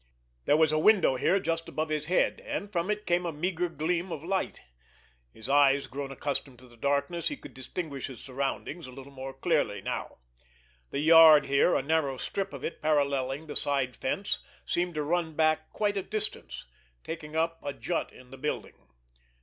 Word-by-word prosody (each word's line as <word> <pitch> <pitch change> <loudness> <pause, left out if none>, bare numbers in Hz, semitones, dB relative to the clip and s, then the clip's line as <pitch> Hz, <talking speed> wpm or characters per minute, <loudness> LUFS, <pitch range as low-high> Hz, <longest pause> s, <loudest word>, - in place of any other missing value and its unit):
There 145 - +4
was 160 -1 +4
a 155 - +2
window 190 -6 +5
here 185 +9 +2
just 165 -2 -2
above 155 0 -2
his 155 0 -2
head, 180 - +2
and 205 - -4
from 175 0 -1
it 210 0 -1
came 175 0 +2
a 170 - -2
meager 175 +3 -1
gleam 170 +3 -1
of 155 -2 -5
light. 190 +2 -2 0.7
His 110 - -9
eyes 140 0 +4
grown 135 +1 -6
accustomed 135 -1 -3
to 125 +1 -15
the 120 - -17
darkness, 140 +7 0
he 295 - -2
could - - -12
distinguish 140 +1 -5
his 130 -5 -10
surroundings 140 +4 -4
a - - -10
little 135 +2 -11
more 135 0 -7
clearly 135 - 0
now. - - -4 0.7
The 140 - -2
yard 160 -2 +8
here, 140 +5 +3
a - - +1
narrow 145 -3 +1
strip 195 +8 -3
of - - -8
it - - -5
paralleling 140 -2 +1
the 150 - -7
side 135 -3 +1
fence, 195 +9 -1 0.3
seemed 175 -1 -1
to 150 - -1
run 160 0 -1
back 155 0 +2
quite 205 -1 0
a - - +1
distance, 195 - -4 0.4
taking 160 -2 -7
up 165 +1 0
a 145 - -2
jut 165 +4 -3
in 125 0 -16
the 135 - -9
building. 150 +2 -4
155 Hz, 190 wpm, -29 LUFS, 140-170 Hz, 0.7 s, yard